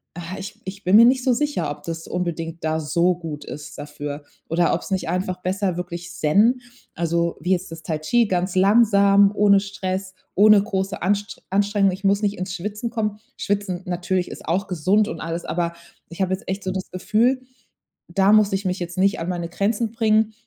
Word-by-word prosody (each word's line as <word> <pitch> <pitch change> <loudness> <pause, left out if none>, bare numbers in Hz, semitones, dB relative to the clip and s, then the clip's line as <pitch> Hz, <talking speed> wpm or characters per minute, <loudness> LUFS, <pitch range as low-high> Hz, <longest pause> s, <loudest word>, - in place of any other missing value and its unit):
ah, 175 +2 -6
ich 210 +3 -8
ich 195 +2 -7
bin 185 +3 +4
mir 230 +2 +9
nicht 255 +1 +3
so 255 - +3
sicher, 290 - -1
ob 145 - -7
das 165 0 -6
unbedingt 170 -2 -4
da 160 0 0
so 170 +4 +2
gut 160 -4 -7
ist 150 - -8
dafür. 145 0 -6 0.3
Oder 170 +1 +2
ob's 170 - -3
nicht 190 -3 -1
einfach 185 +1 -2
besser 185 -1 -1
wirklich 175 -1 -6
Zen 215 +11 +3 0.3
also 170 0 0
wie 180 +4 -1
jetzt 185 -1 0
das 165 0 -9
Tai-Chi 160 +10 +1
ganz 185 0 -1
langsam, 200 0 +5
ohne 200 -1 +5
Stress, 190 -1 -4 0.2
ohne 210 0 +6
große 195 -1 -3
Anst 205 +2 -1
Anstrengung, 200 0 +2
ich 190 +2 -7
muss 200 +1 +2
nicht 205 0 0
ins 185 0 -4
Schwitzen 210 +5 -4
kommen. 215 -3 -2 0.2
Schwitzen 200 -3 -2
natürlich 180 0 -1
ist - - -10
auch 185 +4 0
gesund 190 +4 +2
und 165 - -6
alles, 165 +1 -4
aber 170 0 -1 0.4
ich 170 +3 -7
habe 190 0 0
jetzt 190 - -5
echt 195 +1 -3
so 185 - -2
das 185 0 -4
Gefühl, 225 +8 +1 0.7
da 195 +3 +3
muss 215 -1 +5
ich 195 +1 -1
mich 185 0 -1
jetzt 175 0 -6
nicht 195 +3 +2
an 165 - -3
meine 175 -2 -3
Grenzen 210 +5 -1
bringen. 220 -1 +2
190 Hz, 195 wpm, -22 LUFS, 170-205 Hz, 0.7 s, mir